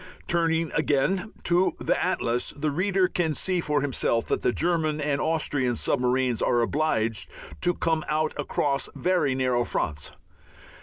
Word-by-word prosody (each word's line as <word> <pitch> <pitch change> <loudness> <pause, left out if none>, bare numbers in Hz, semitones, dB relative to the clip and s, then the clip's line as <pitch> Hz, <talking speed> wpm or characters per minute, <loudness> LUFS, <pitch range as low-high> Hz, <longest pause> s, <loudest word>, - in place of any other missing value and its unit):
Turning 165 -1 +1
again 170 +8 0
to 175 +2 +2
the - - +1
atlas 120 +1 -1
the 150 +1 -1
reader 185 +4 +2
can 165 -4 -1
see 185 +2 0
for 150 -3 0
himself 125 -4 0
that - - -1
the - - +2
German 160 0 0
and 145 -1 0
Austrian 145 -6 0
submarines 125 0 +1
are 120 - +2
obliged 115 -5 0 0.3
to 175 - +1
come 160 -1 0
out 155 0 0
across 140 -1 -1
very 175 -7 +1
narrow 125 -2 +1
fronts. 75 -9 -3
150 Hz, 145 wpm, -26 LUFS, 130-165 Hz, 0.3 s, to